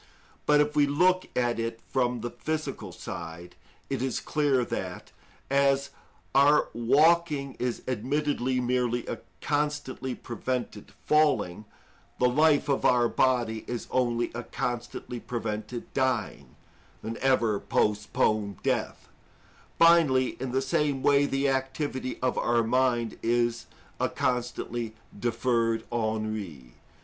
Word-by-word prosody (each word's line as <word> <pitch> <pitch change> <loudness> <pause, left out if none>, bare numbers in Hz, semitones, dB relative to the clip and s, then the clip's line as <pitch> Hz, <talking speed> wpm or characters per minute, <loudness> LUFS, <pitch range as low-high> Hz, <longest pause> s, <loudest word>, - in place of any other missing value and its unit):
But 150 0 +6
if 150 0 0
we 145 -1 +4
look 180 +6 +3
at 120 -2 +1
it 115 0 -3
from 125 -2 +1
the 120 +1 -4
physical 155 0 -4
side; 85 +1 -8 0.3
it - - -2
is 130 -2 -1
clear 140 -5 +1
that, - - -5 0.4
as 140 0 +2 0.4
our 145 +2 +5
walking 150 +3 +3
is 125 -1 -2
admittedly 130 +1 0
merely 120 -1 0
a - - -4 0.2
constantly 145 -3 -2
prevented 120 -2 -4
falling, 145 - +2 0.5
the 125 - +3
life 150 +4 +3
of 140 -2 0
our 120 -1 +4
body 120 -4 +1
is 120 -1 -4
only 120 -2 +1
a 120 - -4
constantly 120 0 -4
prevented 115 0 -5
dying, 115 - -1 0.5
an 115 +1 -5
ever 120 -6 +2
postponed 105 -1 0
death: - - -1 0.7
finally, 160 -7 +5
in 130 -1 -3
the 135 +1 0
same 135 0 0
way, 140 0 +4
the 135 0 0
activity 135 0 -2
of 130 - +1
our 120 0 +2
mind 120 -1 +1
is 120 0 0 0.3
a - - +1
constantly 120 -2 -2 0.2
deferred 115 -1 +1
ennui. 110 - -3
125 Hz, 120 wpm, -28 LUFS, 115-140 Hz, 0.7 s, But